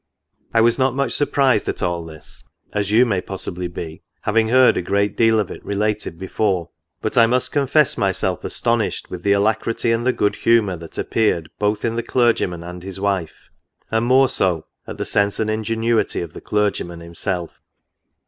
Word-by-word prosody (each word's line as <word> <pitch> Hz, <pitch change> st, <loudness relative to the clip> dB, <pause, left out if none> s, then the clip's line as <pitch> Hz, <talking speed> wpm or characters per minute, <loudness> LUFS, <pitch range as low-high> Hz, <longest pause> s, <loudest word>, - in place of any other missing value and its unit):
I 115 Hz, -, +3 dB
was 115 Hz, +3 st, +3 dB
not 130 Hz, -1 st, +2 dB
much 140 Hz, -3 st, 0 dB
surprised 135 Hz, -5 st, +2 dB
at -, -, -3 dB
all 85 Hz, -1 st, -1 dB
this, 80 Hz, -1 st, -10 dB, 0.3 s
as 100 Hz, -1 st, -1 dB
you 115 Hz, +4 st, +5 dB
may 100 Hz, -6 st, 0 dB
possibly 90 Hz, -2 st, -4 dB
be, 80 Hz, -2 st, -7 dB, 0.2 s
having 110 Hz, +1 st, +2 dB
heard 130 Hz, +1 st, +5 dB
a -, -, 0 dB
great 100 Hz, +3 st, 0 dB
deal 115 Hz, -1 st, +4 dB
of 105 Hz, -, -2 dB
it -, -, -9 dB
related 105 Hz, -3 st, -2 dB
before. 95 Hz, -2 st, -1 dB, 0.3 s
But -, -, +1 dB
I 115 Hz, -, +7 dB
must 125 Hz, +2 st, 0 dB
confess 145 Hz, +1 st, +2 dB
myself" 95 Hz, -2 st, 0 dB
astonished -, -, 0 dB
with 90 Hz, -, -6 dB
the 100 Hz, +2 st, +3 dB
alacrity 110 Hz, +3 st, +1 dB
and 115 Hz, +1 st, +1 dB
the 130 Hz, -, +3 dB
good 105 Hz, -4 st, 0 dB
humour 115 Hz, -5 st, +3 dB
that 85 Hz, 0 st, -11 dB
ap -, -, -4 dB
peared 85 Hz, -8 st, +1 dB
both 105 Hz, +1 st, 0 dB
in 115 Hz, 0 st, -1 dB
the -, -, +1 dB
clergyman 115 Hz, -8 st, +1 dB
and 90 Hz, +1 st, -8 dB
his 95 Hz, +1 st, -7 dB
wife, 95 Hz, -5 st, -3 dB, 0.4 s
and 110 Hz, +1 st, +1 dB
more 130 Hz, +1 st, +5 dB
so, 90 Hz, -9 st, 0 dB, 0.2 s
at -, -, -7 dB
the -, -, -3 dB
sense 100 Hz, 0 st, +1 dB
and 110 Hz, -1 st, 0 dB
ingenuity 115 Hz, +1 st, 0 dB
of 85 Hz, -2 st, -7 dB
the -, -, -9 dB
clergyman 100 Hz, -5 st, -1 dB
himself." 85 Hz, +1 st, -5 dB
105 Hz, 185 wpm, -20 LUFS, 90-115 Hz, 0.4 s, I